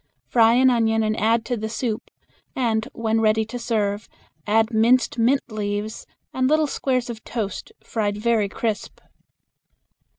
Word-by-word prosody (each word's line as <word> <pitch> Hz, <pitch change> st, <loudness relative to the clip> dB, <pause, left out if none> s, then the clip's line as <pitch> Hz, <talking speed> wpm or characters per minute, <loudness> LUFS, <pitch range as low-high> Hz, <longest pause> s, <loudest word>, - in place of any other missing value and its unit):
Fry 230 Hz, -1 st, +4 dB
an 260 Hz, +1 st, +5 dB
onion 225 Hz, -2 st, +2 dB
and 215 Hz, 0 st, 0 dB
add 225 Hz, +1 st, +2 dB
to 245 Hz, -, -1 dB
the 220 Hz, -1 st, -4 dB
soup, 220 Hz, -1 st, -3 dB, 0.5 s
and 225 Hz, -3 st, 0 dB
when 225 Hz, -1 st, 0 dB
ready 220 Hz, 0 st, +2 dB
to 245 Hz, +3 st, -6 dB
serve 210 Hz, -3 st, -1 dB, 0.4 s
add 225 Hz, +2 st, +2 dB
minced 235 Hz, +2 st, +3 dB
mint 255 Hz, +5 st, +3 dB
leaves 210 Hz, 0 st, -4 dB, 0.3 s
and 255 Hz, 0 st, +1 dB
little 310 Hz, +1 st, +3 dB
squares 255 Hz, -3 st, -1 dB
of 230 Hz, -2 st, -7 dB
toast, 210 Hz, -5 st, -5 dB
fried 205 Hz, -2 st, -2 dB
very 215 Hz, -2 st, +1 dB
crisp. 220 Hz, 0 st, -3 dB
225 Hz, 145 wpm, -23 LUFS, 215-240 Hz, 0.5 s, an